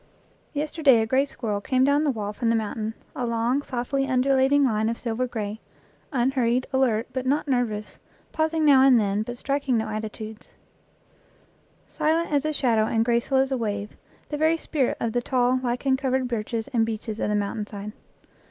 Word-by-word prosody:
Yesterday 295 Hz, -4 st, +3 dB
a 220 Hz, -, +1 dB
gray 265 Hz, +5 st, +2 dB
squirrel 215 Hz, -6 st, -3 dB
came 255 Hz, +4 st, +1 dB
down 285 Hz, +2 st, +3 dB
the -, -, +2 dB
wall 210 Hz, -5 st, -3 dB
from 230 Hz, +2 st, -1 dB
the 230 Hz, -, +3 dB
mountain 220 Hz, 0 st, -3 dB, 0.2 s
a 250 Hz, -, -3 dB
long, 235 Hz, +3 st, 0 dB
softly 270 Hz, +1 st, -2 dB
undulating 270 Hz, +2 st, +3 dB
line 220 Hz, -2 st, +1 dB
of 230 Hz, -, -2 dB
silver 240 Hz, +1 st, -2 dB
gray; 215 Hz, -2 st, -4 dB, 0.5 s
unhurried, 255 Hz, -2 st, +1 dB
alert, 245 Hz, -4 st, +2 dB
but 260 Hz, 0 st, -3 dB
not 290 Hz, +3 st, +1 dB
nervous, 235 Hz, -5 st, -2 dB, 0.3 s
pausing 315 Hz, 0 st, 0 dB
now 275 Hz, -3 st, +7 dB
and 265 Hz, -3 st, +6 dB
then, 205 Hz, -1 st, 0 dB
but 240 Hz, +2 st, -5 dB
striking 275 Hz, -2 st, 0 dB
no 220 Hz, -, -1 dB
attitudes; 215 Hz, 0 st, -7 dB, 1.3 s
silent 325 Hz, +2 st, 0 dB
as 290 Hz, 0 st, +1 dB
a 310 Hz, -, +1 dB
shadow 230 Hz, -7 st, +2 dB
and 225 Hz, 0 st, +1 dB
graceful 240 Hz, +3 st, +1 dB
as 265 Hz, +1 st, +2 dB
a 265 Hz, -, +1 dB
wave 205 Hz, -2 st, -3 dB, 0.3 s
the 295 Hz, -, -3 dB
very 320 Hz, +1 st, +3 dB
spirit 290 Hz, -5 st, -1 dB
of 230 Hz, -1 st, -2 dB
the 245 Hz, -, +1 dB
tall, 250 Hz, 0 st, +1 dB
lichen 255 Hz, +2 st, 0 dB
covered 260 Hz, -1 st, 0 dB
birches 230 Hz, -1 st, -3 dB
and 230 Hz, -3 st, +2 dB
beeches 220 Hz, -1 st, -4 dB
of -, -, -1 dB
the 210 Hz, -, +1 dB
mountain 205 Hz, +1 st, -2 dB
side. 205 Hz, 0 st, -7 dB
245 Hz, 180 wpm, -25 LUFS, 220-270 Hz, 1.3 s, now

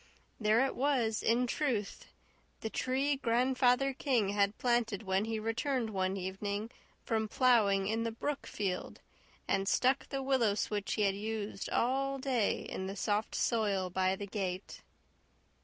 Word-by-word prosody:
There 220 Hz, +4 st, +4 dB
it 270 Hz, -, -3 dB
was, 250 Hz, -6 st, +1 dB
in 235 Hz, +2 st, +2 dB
truth 245 Hz, -6 st, -2 dB, 0.5 s
the 220 Hz, -, -4 dB
tree 270 Hz, +2 st, 0 dB
Grandfather 255 Hz, +2 st, +2 dB
King 250 Hz, -7 st, +1 dB
had 200 Hz, 0 st, +1 dB
planted 235 Hz, -4 st, +1 dB
when 190 Hz, +1 st, +1 dB
he 225 Hz, 0 st, -2 dB
returned 230 Hz, +2 st, -1 dB
one 190 Hz, -1 st, -1 dB
evening 200 Hz, +4 st, -3 dB, 0.3 s
from 220 Hz, -2 st, 0 dB
ploughing 210 Hz, -5 st, +3 dB
in 220 Hz, +3 st, 0 dB
the 230 Hz, -, 0 dB
brook 280 Hz, +5 st, -4 dB
field 190 Hz, -3 st, -3 dB, 0.5 s
and 195 Hz, 0 st, +1 dB
stuck 260 Hz, +2 st, +2 dB
the 270 Hz, -1 st, -3 dB
willow 255 Hz, -6 st, +2 dB
switch 205 Hz, -1 st, -2 dB
he 215 Hz, -, +1 dB
had 195 Hz, -1 st, +3 dB
used 210 Hz, 0 st, -4 dB
all 275 Hz, +3 st, +1 dB
day 255 Hz, -5 st, 0 dB
in 190 Hz, -, -5 dB
the 195 Hz, -, -5 dB
soft 205 Hz, +2 st, -1 dB
soil 200 Hz, -6 st, +1 dB
by 185 Hz, +1 st, +1 dB
the 200 Hz, -, -6 dB
gate. 190 Hz, -2 st, -4 dB
220 Hz, 150 wpm, -32 LUFS, 200-255 Hz, 0.5 s, There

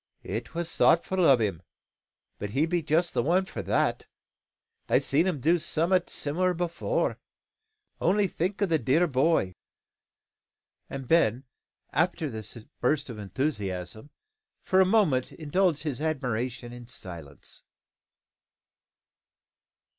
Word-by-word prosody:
It 110 Hz, +8 st, -5 dB
was 170 Hz, 0 st, -3 dB
thoughtful 185 Hz, +2 st, +3 dB
o' 140 Hz, -6 st, +7 dB
him; 100 Hz, -7 st, -1 dB, 0.8 s
but 105 Hz, -, -4 dB
he 135 Hz, +9 st, +1 dB
be 175 Hz, +1 st, 0 dB
just 160 Hz, +3 st, +1 dB
the -, -, +2 dB
one 180 Hz, +8 st, +2 dB
for -, -, -6 dB
that. -, -, 0 dB, 0.8 s
I've -, -, +3 dB
seed 155 Hz, +6 st, +2 dB
him 175 Hz, -6 st, -1 dB
do 165 Hz, +6 st, +3 dB
some'at 170 Hz, +3 st, +1 dB
similar 180 Hz, +5 st, -1 dB
afore. 175 Hz, -, -1 dB, 0.8 s
Only 200 Hz, +4 st, +3 dB
think 190 Hz, +3 st, -1 dB
o' -, -, +5 dB
the 165 Hz, -4 st, +1 dB
dear 145 Hz, +8 st, +3 dB
boy!" 135 Hz, -, +2 dB, 1.4 s
And 135 Hz, -2 st, -6 dB
Ben, 130 Hz, -6 st, +3 dB, 0.5 s
after 160 Hz, -1 st, +1 dB
this 110 Hz, +1 st, -6 dB, 0.2 s
burst 140 Hz, +1 st, 0 dB
of 110 Hz, -, -8 dB
enthusiasm, 105 Hz, -, -3 dB, 0.5 s
for 190 Hz, 0 st, +4 dB
a 185 Hz, -, +4 dB
moment 185 Hz, -, +2 dB
indulged 160 Hz, 0 st, 0 dB
his 145 Hz, -4 st, -3 dB
admiration 125 Hz, -5 st, -2 dB
in 120 Hz, -1 st, -10 dB
silence. 85 Hz, -, -7 dB
150 Hz, 125 wpm, -27 LUFS, 120-175 Hz, 1.4 s, o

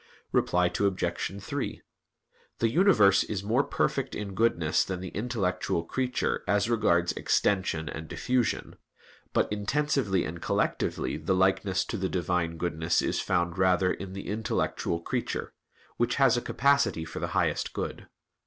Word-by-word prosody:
Reply 90 Hz, 0 st, +2 dB
Obj. 100 Hz, 0 st, -1 dB
3: 140 Hz, +5 st, -4 dB, 0.8 s
The 115 Hz, -, +2 dB
universe 110 Hz, -, +5 dB
is 100 Hz, -3 st, -4 dB
more 115 Hz, +7 st, +2 dB
perfect 135 Hz, -1 st, -1 dB
in 100 Hz, -2 st, -5 dB
goodness 90 Hz, -7 st, +2 dB
than 95 Hz, -2 st, -4 dB
the 95 Hz, 0 st, -6 dB
intellectual 95 Hz, -6 st, -1 dB
creature 125 Hz, +8 st, -1 dB
as 105 Hz, +1 st, +2 dB
regards 85 Hz, -7 st, +2 dB
extension 90 Hz, -5 st, 0 dB
and 80 Hz, +1 st, -6 dB
diffusion; 125 Hz, +5 st, -1 dB, 0.5 s
but -, -, +2 dB
intensively 105 Hz, -, 0 dB
and 85 Hz, +2 st, -6 dB
collectively 65 Hz, +3 st, -1 dB
the 80 Hz, +4 st, 0 dB
likeness 95 Hz, 0 st, +2 dB
to 110 Hz, -, -4 dB
the 95 Hz, -1 st, -1 dB
Divine 90 Hz, -2 st, -1 dB
goodness 85 Hz, 0 st, 0 dB
is -, -, 0 dB
found 90 Hz, -1 st, 0 dB
rather 90 Hz, 0 st, +3 dB
in 95 Hz, -1 st, -7 dB
the 95 Hz, -, -7 dB
intellectual 105 Hz, -4 st, -1 dB
creature, -, -, -3 dB, 0.4 s
which -, -, +1 dB
has -, -, +4 dB
a -, -, 0 dB
capacity 125 Hz, -11 st, +2 dB
for -, -, -7 dB
the -, -, -2 dB
highest -, -, +1 dB
good. -, -, -5 dB
95 Hz, 145 wpm, -28 LUFS, 90-110 Hz, 0.8 s, universe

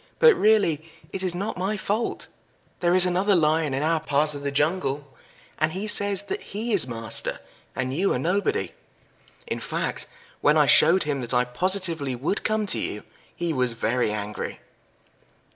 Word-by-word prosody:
But 475 Hz, -1 st, +7 dB
really 210 Hz, -, +2 dB, 0.3 s
it 195 Hz, -, -3 dB
is 185 Hz, -2 st, -1 dB
not 195 Hz, +1 st, -4 dB
my 200 Hz, +3 st, -1 dB
fault. 210 Hz, +4 st, -2 dB, 0.5 s
There 175 Hz, 0 st, +2 dB
is 185 Hz, 0 st, +8 dB
another 185 Hz, +3 st, +2 dB
Lion 155 Hz, -3 st, +2 dB
in 135 Hz, -, -1 dB
our 160 Hz, +1 st, +2 dB
part 150 Hz, 0 st, +1 dB
of 145 Hz, -, -5 dB
the 140 Hz, -, -2 dB
jungle, 145 Hz, -1 st, -1 dB, 0.5 s
and 155 Hz, 0 st, +1 dB
he 195 Hz, +3 st, -4 dB
says 205 Hz, -1 st, +1 dB
that -, -, -4 dB
he 220 Hz, +3 st, -4 dB
is 180 Hz, -10 st, +5 dB
master, 115 Hz, -2 st, -3 dB, 0.4 s
and 130 Hz, 0 st, -2 dB
you 190 Hz, +7 st, +1 dB
are -, -, 0 dB
nobody. 200 Hz, -, 0 dB, 0.7 s
In -, -, -4 dB
fact, -, -, -3 dB, 0.3 s
when -, -, +4 dB
I -, -, +5 dB
showed 185 Hz, +3 st, +5 dB
him 145 Hz, -2 st, -2 dB
that 120 Hz, +1 st, -1 dB
I 125 Hz, 0 st, +3 dB
positively 165 Hz, 0 st, 0 dB
would 145 Hz, -, -2 dB
come 215 Hz, -1 st, 0 dB
to 200 Hz, -, +1 dB
you -, -, -4 dB, 0.3 s
he 170 Hz, -1 st, -2 dB
was 125 Hz, -3 st, 0 dB
very 115 Hz, 0 st, 0 dB
angry." 105 Hz, 0 st, -5 dB
165 Hz, 175 wpm, -25 LUFS, 140-195 Hz, 0.7 s, is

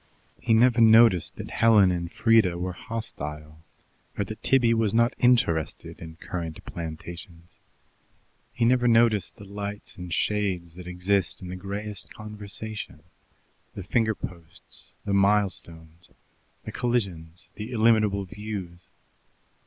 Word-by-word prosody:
He 115 Hz, -, +2 dB
never 120 Hz, +1 st, +4 dB
noticed 110 Hz, -5 st, +6 dB
that -, -, -8 dB
Helen 105 Hz, -5 st, +5 dB
and 85 Hz, -1 st, -3 dB
Frieda 110 Hz, -7 st, +3 dB
were 90 Hz, +1 st, -3 dB
hostile, 75 Hz, -8 st, -6 dB, 0.6 s
or 100 Hz, -, 0 dB
that 110 Hz, +3 st, -8 dB
Tibby 120 Hz, -3 st, +3 dB
was 115 Hz, -2 st, +1 dB
not 115 Hz, +2 st, +3 dB
interested 85 Hz, -11 st, +1 dB
in 80 Hz, -1 st, -9 dB
currant 85 Hz, -1 st, -6 dB
plantations; 85 Hz, +1 st, -8 dB, 0.9 s
he 120 Hz, -, 0 dB
never 125 Hz, 0 st, +3 dB
noticed 115 Hz, -3 st, +3 dB
the 100 Hz, -, -12 dB
lights 100 Hz, +1 st, -7 dB
and 90 Hz, -1 st, -8 dB
shades 95 Hz, -4 st, -1 dB
that 90 Hz, +1 st, -10 dB
exist 90 Hz, +1 st, 0 dB
in 90 Hz, -, -7 dB
the 90 Hz, -, -5 dB
grayest 100 Hz, +2 st, -5 dB
conversation, 105 Hz, -5 st, -7 dB, 0.7 s
the 95 Hz, -, -6 dB
finger 110 Hz, +3 st, +1 dB
posts, 85 Hz, -4 st, -10 dB
the 100 Hz, -, -1 dB
milestones, 90 Hz, -5 st, 0 dB, 0.6 s
the -, -, -5 dB
collisions, 95 Hz, -9 st, -2 dB
the 105 Hz, +2 st, -7 dB
illimitable 110 Hz, -4 st, +3 dB
views. 95 Hz, -3 st, -7 dB
100 Hz, 125 wpm, -26 LUFS, 85-110 Hz, 0.9 s, noticed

